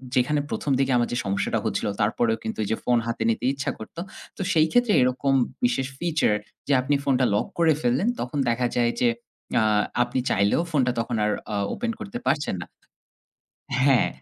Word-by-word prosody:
যেখানে 140 +4 +2
প্রথম 145 - -2
দিকে 135 0 +2
আমার 120 -1 +2
যে 120 - 0
সমস্যাটা 100 0 0
হচ্ছিল - - -1
তারপরেও 110 +2 +1
কিন্তু 110 - -4
যে 110 - +1
ফোন 125 -1 +3
হাতে 115 - -2
নিতে 115 +1 -1
ইচ্ছা 135 - -2
করত। 110 - -11 0.4
তো - - -5
সেই 160 -1 +4
ক্ষেত্রে 245 -3 +3
এরকম 130 +2 +1 0.3
বিশেষ 125 +2 +1
ফিচার 165 -9 +1 0.3
যে 145 - +3
আপনি 140 +3 +1
ফোনটা 130 -2 +2
লক - - 0
করে 165 -2 +5
ফেললেন 125 - +1
তখন 125 +4 -4
দেখা 120 +1 +1
যায় 120 -1 +2
যে 125 - +4 0.5
আ - - +3 0.4
আপনি 120 +1 -2
চাইলেও 100 - +2
ফোনটা 130 -5 +2 0.3
আর 105 - +1 0.2
আও 100 - 0
ওপেন 235 +2 -2
করতে 195 - -6
পারছেন 140 -3 0
না। - - -6 1.2
হ্যাঁ, 135 -3 +4
125 Hz, 175 wpm, -25 LUFS, 120-145 Hz, 1.2 s, করে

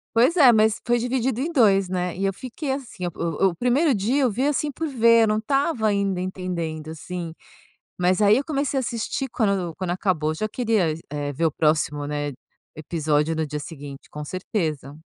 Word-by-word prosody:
Pois 250 +9 +4
é, 280 -8 +8
mas 220 -1 +3
foi 240 +1 +3
dividido 245 0 -1
em 325 - -2
2, 200 - +4
né, 180 -1 -2
e 195 - -1
eu 195 - +1
fiquei 260 - -5
assim 255 -9 -5
o 170 +1 0
o 170 - -7
1º 255 - +2
dia, 240 +8 +1
eu 250 - +2
vi, 255 +7 0
assim, 295 0 0
por 320 +4 -3
ver, 230 -4 +5
eu - - +3
não 215 - +1
estava 275 +1 0
ainda 200 -3 0
entendendo, 175 -4 -4
assim, 165 +1 -6 0.7
mas, 180 +2 +2
aí, 205 0 +6
eu 275 - 0
comecei 280 -2 -1
a - - 0
assistir, 235 +3 -3
quando 200 -8 0
quando 185 -2 -3
acabou 175 -5 0
já 215 +7 -2
queria 215 -9 +1
é 145 0 -3
ver 165 +5 0
o 160 - +2
próximo, 150 -1 0
né, 145 0 -2 0.4
episódio 155 0 0
no 160 0 -1
dia 150 0 -4
seguinte 145 -3 -9
com 150 0 -7
certeza. 155 - -3
195 Hz, 195 wpm, -24 LUFS, 160-240 Hz, 0.7 s, é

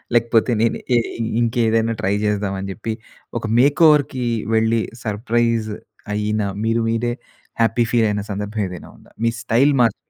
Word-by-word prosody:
లేకపోతే 115 0 +3
నేను 115 - +2 0.2
ఎ - - +5 0.4
ఇంకేదైనా 115 -1 +1
ట్రై 95 - +1
జేద్దామని 100 -2 -1
చెప్పి 110 +1 -4 0.5
ఒక 115 - -6
మేక్‌ఓవర్‌కి 145 -2 +4 0.3
వెళ్ళి 110 +1 +2 0.2
సర్ప్రైజ్ 115 +1 0 0.4
అయిన 105 +1 -1 0.2
మీరు 115 +1 +1
మీరే 115 +1 0 0.5
హ్యాపీ 115 +1 +3
ఫీల్ 115 -2 +3
అయిన 105 0 -1
సందర్భం 105 +2 -3
ఏదైనా 90 -1 -9
ఉందా? - - -21
మీ 115 - +3
స్టైల్ 135 +5 +3
మారి 115 -3 +3
115 Hz, 135 wpm, -20 LUFS, 105-120 Hz, 0.5 s, ఎ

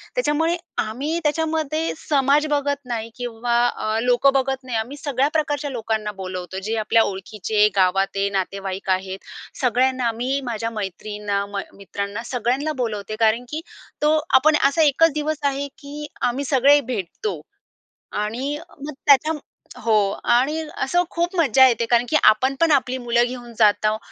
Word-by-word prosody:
त्याच्यामुळे 325 -7 +1 0.3
आम्ही 280 +10 -3
त्याच्यामध्ये 315 0 0
समाज 285 0 +2
बघत 285 0 -1
नाही 230 -2 -4
किंवा 240 -1 -2
अ, 215 -2 -2
लोकं 250 +3 +4
बघत 270 0 0
नाही, 250 -3 -3
आम्ही 240 +6 -4
सगळ्या 280 -2 0
प्रकारच्या 295 -2 -1
लोकांना 220 -3 -2
बोलवतो. 185 0 -5
जे 220 +3 -2
आपल्या 220 +1 +3
ओळखीचे, 210 +2 0
गावातेत, 195 +1 +1
नातेवाईक 195 0 -3
आहेत, 190 +1 -1 0.4
सगळ्यांना 250 0 +2
मी 260 +4 -1
माझ्या 230 -1 -2
मैत्रिणींना, 205 -1 -3
म 200 -1 -3 0.2
मित्रांना 200 +2 -5
सगळ्यांना 255 +5 -1
बोलवते. 215 -2 -3
कारण 225 +2 +3
की 310 +3 -4 0.4
तो 305 +1 +4 0.2
आपण 310 +3 +4
असा 280 +4 +1
1कच 315 +3 +4
दिवस 305 0 -1
आहे 280 0 0
की 285 0 -10 0.3
आम्ही 250 +3 0
सगळे 280 +2 +5
भेटतो. 235 - -4 0.7
आणि 240 +8 -2 0.3
मग 300 - -5
त्याच्या 290 +3 +5 0.5
हो 230 - +1 0.4
आणि 285 +6 +2 0.2
अशी 310 +7 +1
खूप 345 +2 -1
मजा 265 -5 +6
येते. 235 -1 0
कारण 240 +1 +3
की 310 - +2
आपण 260 +5 +4
पण 330 -1 +4
आपली 260 -2 +2
मुलं 240 -1 +2
घेऊन 240 -1 -8
जात 210 0 +4
आहोत 215 0 +1
245 Hz, 150 wpm, -22 LUFS, 215-285 Hz, 0.7 s, मजा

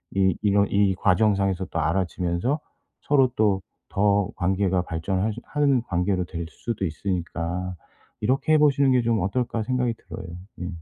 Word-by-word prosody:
이 95 -2 +3
이런 100 -1 +3
이 100 -1 +3
과정상에서 95 0 +2
또 80 - -4
알아지면서 90 - 0 0.4
서로 135 -3 +3
또 100 -3 +3 0.3
더 100 -1 +2
관계가 95 0 +1
발전을 90 +3 -2
할 110 0 0
수 - - -8
하는 140 -4 +2
관계로 90 -2 0
될 85 -1 -5
수도 110 +1 -4
있으니까 90 +1 -3 0.5
'이렇게 135 +7 +2
해 - - +7
보시는 140 -2 +4
게 125 - +4
좀 115 -3 +1
어떨까.' 115 +4 -1
생각이 125 0 0
들어요 95 - -9 0.3
예. 90 - -3
100 Hz, 320 characters per minute, -24 LUFS, 90-115 Hz, 0.5 s, 해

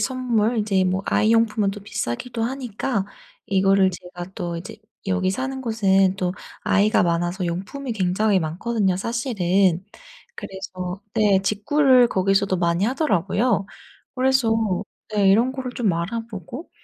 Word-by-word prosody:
선물 245 -3 0
인제 200 -3 +1
뭐 185 +1 0
아이 215 +1 +2
용품은 220 -3 +2
또 205 +1 -8
비싸기도 205 - -4
하니까 245 -3 -2 0.4
이거를 195 0 +3
제가 180 0 -9
또 175 -1 -4
이제 175 +3 -8 0.3
여기 185 -1 +1
사는 265 +6 -3
곳은 195 -5 +2
또 180 -2 -1 0.3
아이가 205 +2 +3
많아서 175 +2 0
용품이 195 +10 -4
굉장히 200 0 +1
많거든요 190 +4 -1
사실은. 195 -5 +1 0.5
그래서 185 0 -7
네 205 -3 +3
직구를 250 +5 +4
거기서도 195 -1 +1
많이 170 +2 +1
하더라고요. 240 - +1 0.5
그래서 260 -2 +2 0.6
네 205 -2 +3
이런 235 +6 +3
거를 260 -2 -5
좀 225 -6 0
알아보고 220 - -5
200 Hz, 295 characters per minute, -22 LUFS, 185-235 Hz, 0.6 s, 직구를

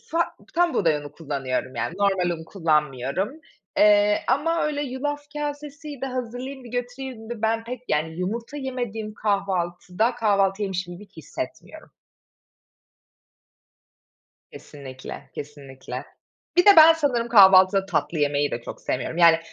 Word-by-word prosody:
fa 330 - +1 0.3
tam 350 -1 +2
buğday 160 -5 +2
unu 145 -1 -8
kullanıyorum, 135 -4 -3
yani, 160 +9 -3
normal 195 -3 +2
un 160 - -10
kullanmıyorum, 155 - -1 0.4
eee, 210 0 +5
ama 330 +4 +1
öyle 295 -1 -1
yulaf 290 +2 -3
kasesiydi, 295 -1 -5
hazırlayayım 255 +1 -5
da - - -10
götüreyim 245 -1 -6
de, 235 -2 -6
ben 225 +1 +1
pek, 250 +1 -7
yani 155 +2 0
yumurta 230 +9 -4
yemediğim 240 -6 -4
kahvaltıda, 195 +1 -1
kahvaltı 200 -2 +1
yemişim 185 -2 -3
gibi 205 +4 -12
hissetmiyorum. 160 - -8 2.6
Kesinlikle, 130 -3 -10
kesinlikle. 135 -2 -8 0.5
Bir 355 - +6
de - - +9
ben 320 +1 +10
sanırım 260 -7 0
kahvaltıda 195 -3 +7
tatlı 160 -3 -1
yemeyi 145 0 +1
de 115 - -3
çok - - -9
sevmiyorum. 130 +5 -3
Yani, 165 -2 +6
205 Hz, 125 wpm, -24 LUFS, 160-255 Hz, 2.6 s, ben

